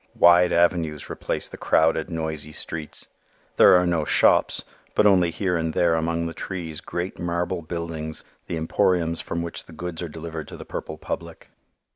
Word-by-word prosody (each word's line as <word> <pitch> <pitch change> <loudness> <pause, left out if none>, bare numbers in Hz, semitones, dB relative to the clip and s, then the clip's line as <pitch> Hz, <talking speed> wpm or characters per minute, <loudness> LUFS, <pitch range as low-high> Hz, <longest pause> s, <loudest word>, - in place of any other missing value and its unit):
Wide 85 +1 +6
avenues 85 -3 +1
replace - - -3
the - - -10
crowded, 80 +1 +2
noisy 80 -2 -4
streets. 80 -1 -5 0.5
There - - +8
are 90 0 +4
no 85 -3 +1
shops - - +3 0.3
but 105 - +4
only 90 -4 +5
here 90 +2 -1
and 80 -1 -1
there 85 -1 +3
among 85 +1 0
the 85 - -4
trees 85 -4 -5
great 90 +3 -4
marble 85 +1 -1
buildings, 80 -1 -5 0.2
the 85 - -3
emporiums 85 +1 +1
from 85 0 -3
which 85 - -6
the 85 - -14
goods 85 +1 -5
are 85 - -4
delivered 80 0 -7
to - - -9
the - - -9
purple - - -6
public. - - -7
85 Hz, 170 wpm, -24 LUFS, 80-85 Hz, 0.5 s, There